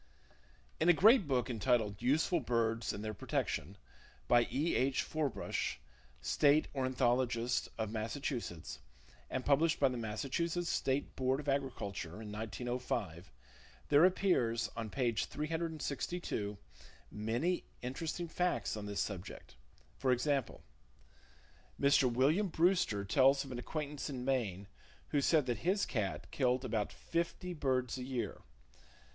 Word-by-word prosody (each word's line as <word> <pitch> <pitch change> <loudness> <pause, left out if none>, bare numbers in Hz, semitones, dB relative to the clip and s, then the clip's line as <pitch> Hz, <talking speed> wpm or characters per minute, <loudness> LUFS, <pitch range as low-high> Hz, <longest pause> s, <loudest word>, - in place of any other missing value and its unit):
In 165 - +3
a - - +9
great 210 - +6
book 130 -3 +1
entitled 115 -4 +1
Useful 155 +7 +2
Birds 115 -3 0
and 105 - -6
Their 110 - -3
Protection, 95 -2 -2 0.5
by 120 -1 +5
E. 145 +8 0
H. 130 +1 +2
Forbush, 150 - -2 0.4
State 145 - +3
Ornithologist 125 -2 +1
of 110 -2 -2
Massachusetts, 110 - -4 0.5
and 130 - -3
published 160 +4 +3
by 135 - +5
the 125 - -4
Massachusetts 150 +10 -2
State 135 +2 -1
Board 130 +1 +1
of 150 - -8
Agriculture 115 - -2
in 105 -2 -7
1905, 110 - -4 0.6
there 145 +2 +6
appears, 180 -11 +2
on 115 -1 -4
page 120 -2 0
362, 155 - -3 0.5
many 120 +12 -1 0.2
interesting 160 +7 -3
facts 180 -4 0
on 105 -1 -5
this 100 -1 -3
subject. 95 - -6 0.4
For 130 - +2
example: 135 0 0 1.2
Mr. 140 -2 +4
William 145 - +3
Brewster 165 - +2
tells 135 +6 +4
of 135 - -9
an 120 - -4
acquaintance 150 +2 -4
in 125 -3 -5
Maine, 105 -8 -1 0.4
who 145 - +2
said 150 0 +3
that 120 -2 -1
his 195 +4 +1
cat 95 -6 -3
killed 130 -1 +1
about 110 -4 -1
fifty 170 +2 -3
birds 130 -5 0
a - - -4
year. 125 -5 -3
130 Hz, 130 wpm, -34 LUFS, 115-150 Hz, 1.2 s, a